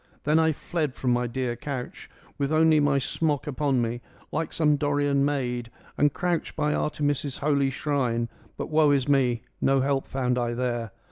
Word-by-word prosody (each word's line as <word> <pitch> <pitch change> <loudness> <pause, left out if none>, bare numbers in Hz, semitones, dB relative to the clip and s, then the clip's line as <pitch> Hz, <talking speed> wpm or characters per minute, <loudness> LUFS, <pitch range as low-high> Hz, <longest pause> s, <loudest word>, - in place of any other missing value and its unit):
" - - -33
Then 150 +2 +3
I 160 0 +4
fled 155 -2 -3
from 125 - 0
my 120 0 +1
dear 125 0 -2
couch, 125 0 -6 0.3
with 140 +1 0
only 155 0 +5
my 145 -1 +3
smock 145 +1 -1
upon 140 -3 0
me, 120 +1 -3 0.3
like 160 +1 -2
some 150 -2 +3
Dorian 145 -1 +1
maid, 125 -4 -1 0.3
and 145 0 +3
crouched 175 +2 -2
by 150 -1 +1
Artemis' 145 -2 -1
holy 140 -2 +2
shrine. 130 -4 -1 0.3
But - - -5
woe 155 -1 +4
is 140 -2 +2
me, 125 -5 +2 0.2
no 135 0 +3
help 135 0 0
found 125 -2 0
I 120 -1 -1
there. 120 -2 -2
140 Hz, 180 wpm, -26 LUFS, 125-150 Hz, 0.3 s, only